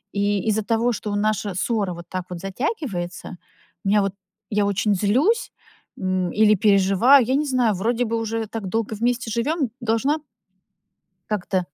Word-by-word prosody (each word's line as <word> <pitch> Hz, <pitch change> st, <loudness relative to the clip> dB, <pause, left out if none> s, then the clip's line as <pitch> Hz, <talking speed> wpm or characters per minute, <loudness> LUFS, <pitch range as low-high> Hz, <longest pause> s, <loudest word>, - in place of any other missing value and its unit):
И 200 Hz, 0 st, 0 dB
из-за 215 Hz, +1 st, +1 dB
того, 230 Hz, +3 st, +1 dB
что 205 Hz, -1 st, -4 dB
наша 210 Hz, -1 st, 0 dB
ссора 200 Hz, -2 st, -1 dB
вот 170 Hz, 0 st, -9 dB
так 185 Hz, -1 st, -4 dB
вот 180 Hz, -1 st, -6 dB
затягивается, 195 Hz, -, -4 dB, 0.5 s
у -, -, +1 dB
меня 210 Hz, +1 st, +4 dB
вот 195 Hz, -1 st, -1 dB, 0.4 s
я 205 Hz, -1 st, +1 dB
очень 205 Hz, +1 st, +1 dB
злюсь, 265 Hz, -, +2 dB, 0.5 s
м, 185 Hz, -2 st, -1 dB
или 215 Hz, 0 st, +4 dB
переживаю. 200 Hz, +6 st, +5 dB
Я 260 Hz, +3 st, +1 dB
не 300 Hz, +2 st, +1 dB
знаю, 250 Hz, -5 st, +2 dB
вроде 230 Hz, +6 st, 0 dB
бы 230 Hz, 0 st, -2 dB
уже 225 Hz, 0 st, -2 dB
так 215 Hz, -2 st, -5 dB
долго 220 Hz, +2 st, -2 dB
вместе 235 Hz, +1 st, -1 dB
живём, 270 Hz, +4 st, 0 dB
должна 235 Hz, +6 st, +1 dB, 1.1 s
как-то 190 Hz, -3 st, -1 dB
215 Hz, 160 wpm, -23 LUFS, 195-235 Hz, 1.1 s, переживаю